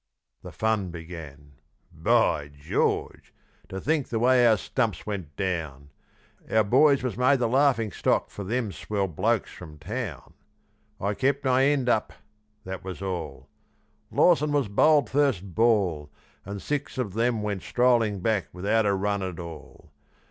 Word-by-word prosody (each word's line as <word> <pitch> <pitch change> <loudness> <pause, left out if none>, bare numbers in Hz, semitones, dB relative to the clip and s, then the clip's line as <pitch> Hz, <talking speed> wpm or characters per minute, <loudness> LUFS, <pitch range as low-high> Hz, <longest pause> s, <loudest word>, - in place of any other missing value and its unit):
The - - -9
fun 110 -4 -1
began. 80 -4 -10 0.4
By 75 -1 +2
George! 70 +1 -2 0.3
to 95 - -5
think 150 +3 0
the 115 - -1
way 125 +1 +4
our 110 -2 +5
stumps 110 -2 -2
went 95 -9 -5
down! 80 -7 -4 0.6
Our 110 0 +3
boys 140 +6 +4
was 125 -3 -3
made 130 +3 +4
the 120 -2 0
laughing 125 -4 +2
stock - - 0
for 100 - -7
them 110 +1 -2
swell 100 +3 -2
blokes 105 +7 0
from 80 -4 -11
town. 95 - -6 0.7
I 100 +2 -1
kept 140 +5 0
my 130 +1 +4
end 140 -3 +1
up 110 -3 +1 0.5
that 95 0 -7
was 95 +1 -7
all, 90 -5 -5 0.6
Lawson 155 -4 +3
was 140 -7 +1
bowled 145 +6 +4
first 130 -10 0
ball, 95 -9 +2 0.4
And 100 0 -6
six 145 -1 -3
of 110 -7 -2
them 115 0 0
went 100 -3 -2
strolling 115 -5 +2
back 110 -2 0
without 105 +4 +1
a 100 - +2
run 100 +1 -1
at 95 -3 -4
all. 80 -3 -10
105 Hz, 150 wpm, -26 LUFS, 90-125 Hz, 0.7 s, our